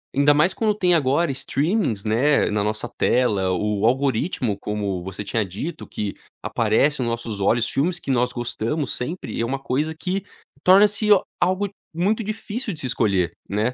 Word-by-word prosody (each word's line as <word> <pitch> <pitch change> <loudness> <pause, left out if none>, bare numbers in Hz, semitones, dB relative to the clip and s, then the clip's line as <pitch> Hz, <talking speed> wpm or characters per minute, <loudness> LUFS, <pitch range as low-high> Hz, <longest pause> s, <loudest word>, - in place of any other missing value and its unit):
ainda 140 +1 +5
mais 155 +6 +3
quando 215 -2 +1
tem 180 -4 +2
agora 145 +1 +2
streamings, 135 - -1
né, 125 +7 +2
na 105 -1 0
nossa 110 +3 -2
tela, 105 -6 +1
o 105 +3 0
algoritmo, 130 - +1
como 100 -4 -3
você 95 +2 -6
tinha 110 +1 -1
dito, 145 - -6
que 105 -2 -4 0.3
aparece 125 +5 +1
no - - -1
nossos 115 -3 -4
olhos, 115 +4 +2
filmes 175 +5 0
que - - -9
nós 125 -1 +2
gostamos, 120 +4 -2
sempre 160 +9 -5
é 115 - +1
uma 135 +3 -2
coisa 140 +4 -1
que 185 +4 -3 0.4
torna-se 205 +3 +5 0.3
algo 185 +3 +1 0.2
muito 200 +7 0
difícil 215 +1 -4
de 160 - -8
se 130 - -3
escolher, 95 -8 +1
né? 110 +5 0
130 Hz, 165 wpm, -22 LUFS, 110-170 Hz, 0.4 s, ainda